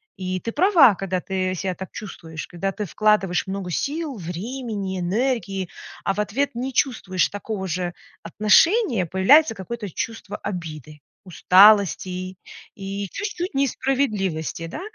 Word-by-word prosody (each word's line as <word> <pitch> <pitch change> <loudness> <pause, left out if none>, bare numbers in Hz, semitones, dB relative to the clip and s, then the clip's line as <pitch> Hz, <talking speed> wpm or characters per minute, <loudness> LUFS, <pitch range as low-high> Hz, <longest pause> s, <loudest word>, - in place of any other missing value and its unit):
И 185 -1 -3
ты 230 - -4
права, 315 - +6
когда 185 -1 -2
ты 185 -1 -2
себя 185 0 -3
так 190 0 -8
чувствуешь, 165 -6 -8
когда 195 +3 -3
ты 210 +2 -4
вкладываешь 200 -1 +2
много 190 -1 -4
сил, 290 - -2
времени, 200 +2 -4
энергии, 195 -1 -1 0.3
а 195 - 0
в - - -4
ответ 230 +7 -1
не 260 +3 -3
чувствуешь 200 -9 +1
такого 205 -1 -5
же 175 0 -2 0.3
отношения, 220 - +3
появляется 210 - +5
какое-то 210 0 -6
чувство 215 +2 -5
обиды, 155 -6 -7 0.2
усталости 195 +1 +5
и 185 +1 -5 0.4
и 195 0 -5
чуть-чуть 400 -4 -4
несправедливости. 245 - -1
Да? 165 - -7
195 Hz, 130 wpm, -23 LUFS, 185-235 Hz, 0.4 s, права